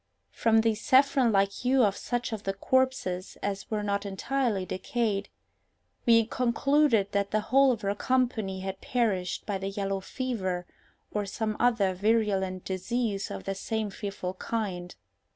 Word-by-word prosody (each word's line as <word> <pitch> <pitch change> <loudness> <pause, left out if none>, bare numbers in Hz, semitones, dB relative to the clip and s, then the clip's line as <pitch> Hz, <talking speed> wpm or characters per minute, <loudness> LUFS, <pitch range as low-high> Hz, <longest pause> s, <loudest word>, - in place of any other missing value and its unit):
From 225 -1 +3
the 225 0 +2
saffron 265 +2 +4
like 195 -1 +3
hue 255 +4 +2
of 200 -2 +2
such 245 +2 -3
of 215 - -4
the 195 -1 -2
corpses 235 -6 0
as 200 -1 -3
were 215 -2 -1
not 200 -1 -1
entirely 205 0 -1
decayed, 200 +2 -2 0.8
we 230 -1 +6
concluded 250 -2 +2
that 200 0 0
the 215 - +1
whole 270 0 +6
of 230 - -2
her 200 0 +1
company 220 -5 0
had 190 0 -5
perished 210 -7 -1
by 200 -2 -2
the 195 +1 -3
yellow 195 0 -2
fever, 190 -6 -3 0.5
or 205 -1 -2
some 215 +2 -2
other 225 -6 +3
virulent 195 -2 +1
disease 200 +2 -2
of - - -6
the 195 - -2
same 215 +1 -3
fearful 195 -3 -5
kind. 190 -4 -4
210 Hz, 150 wpm, -28 LUFS, 195-240 Hz, 0.8 s, we